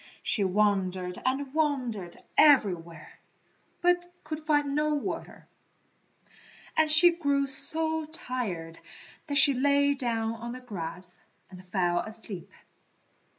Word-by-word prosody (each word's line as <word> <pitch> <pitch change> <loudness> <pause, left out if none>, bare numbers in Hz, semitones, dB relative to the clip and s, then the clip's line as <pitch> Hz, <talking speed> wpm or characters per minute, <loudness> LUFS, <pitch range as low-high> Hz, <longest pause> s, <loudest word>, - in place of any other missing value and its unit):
She 205 - +1
wandered 185 -2 0
and 265 +1 -2
wandered 250 - -2 0.2
everywhere, 175 - +2 0.6
but 355 0 +2 0.2
could 310 0 -5
find 295 -2 0
no 300 +1 0
water, 285 - -6 1.3
and 315 -1 +2
she 345 +3 +8
grew 285 -5 0
so 315 +4 +3
tired 210 - -6 0.5
that 285 -1 0
she 280 0 +7
lay 285 +2 +2
down 230 -5 -2
on 235 +1 -7
the 255 - -8
grass 180 -6 -4 0.3
and 185 0 -12
fell 180 -2 0
asleep. 215 -4 -7
255 Hz, 110 wpm, -27 LUFS, 190-295 Hz, 1.3 s, she